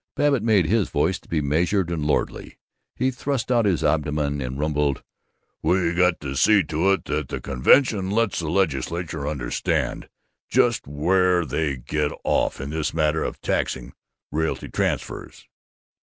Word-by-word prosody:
Babbitt 145 -4 +2
made 105 -6 +3
his 105 +4 +1
voice 80 +6 0
to - - -24
be 80 -2 0
measured 85 +5 +1
and 80 -3 -2
lordly; 75 - -2 0.4
he 130 +1 +1
thrust 130 0 -2
out 120 -3 +3
his 95 -5 +1
abdomen 75 -1 0
and 65 +1 -4
rumbled, 75 -2 0 0.6
"We 90 -2 +1
got 90 -1 +2
to 70 -2 -5
see 100 +8 +5
to 80 +5 +1
it 95 - -3
that 75 -2 -2
the - - -4
convention 100 - +3
lets 110 0 +1
the 80 -3 -3
Legislature 80 -2 -1
understand 70 -5 -2 0.4
just - - +2
where 90 +4 +2
they 70 +1 -1
get 75 +4 -2
off - - 0
in 70 +2 -5
this 80 0 -2
matter 80 0 +1
of - - -4
taxing - - -2 0.4
realty 80 +2 -2
transfers." - - -3
80 Hz, 155 wpm, -23 LUFS, 75-95 Hz, 0.6 s, see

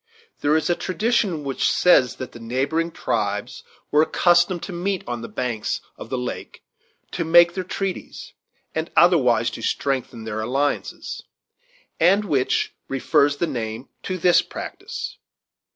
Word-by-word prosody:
There 150 +2 +3
is 160 - -1
a 175 - +3
tradition 190 -4 0
which 135 -2 0
says 130 -9 +4
that 130 - -7
the 120 - -11
neighboring 135 +8 -1
tribes 105 -7 -2 0.3
were 150 - +5
accustomed 175 +2 +3
to 190 - -6
meet 185 +2 -2
on 120 -1 -3
the 115 - -6
banks 120 -4 -2 0.2
of - - -10
the - - -2
lake 60 - -6 0.5
to - - -2
make 170 +1 +6
their 185 - -3
treaties, 190 +1 -5 0.4
and 160 +1 -2
otherwise 125 -10 +4
to - - -7
strengthen 130 -4 -2
their 110 0 -4
alliances, 135 +6 -2 0.8
and 195 +5 +4
which 140 -8 0
refers 145 +1 +2
the 170 - +1
name 120 -4 -5
to 185 - -3
this 175 0 +5
practice. 480 +6 -7
155 Hz, 145 wpm, -23 LUFS, 125-175 Hz, 0.8 s, make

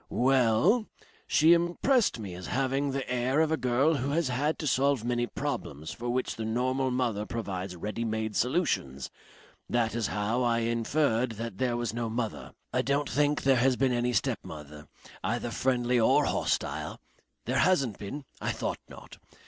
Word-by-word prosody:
Well 130 - +3 0.4
She 160 +3 +6
impressed 175 - +2
me 100 -5 -6
as 90 +1 -7
having 135 +2 0
the 135 0 -3
air 125 +3 +1
of 160 0 +3
a - - +3
girl 130 +3 +2
who 135 +1 -2
has 155 -1 +1
had 145 +5 0
to - - -5
solve 140 -2 +2
many 120 0 0
problems 80 -6 -4
for 120 +8 -5
which 125 +1 -1
the 110 - -3
normal 130 +4 0
mother 120 -5 0
provides 95 -5 -4
ready 105 +6 -4
made 110 -1 -2
solutions. 110 - 0 0.6
That 120 -2 +1
is 115 -1 0
how 105 +4 -1
I 120 -1 +2
inferred 115 +1 +1
that 115 -2 -6
there 125 -2 +1
was 120 -3 -2
no 115 -1 -2
mother. 115 -1 -4 0.2
I - - +2
don't 140 -1 0
think 145 +4 +1
there 135 -1 +4
has 130 +2 +3
been 130 0 +2
any 120 +1 0
stepmother, 75 -6 -3 0.4
either - - -1
friendly 125 -1 +1
or 110 - +4
hostile? - - -1 0.5
There 130 +3 0
hasn't 140 - +2
been. 135 +8 -6 0.2
I - - -1
thought - - -3
not. - - -12
120 Hz, 170 wpm, -29 LUFS, 110-135 Hz, 0.6 s, She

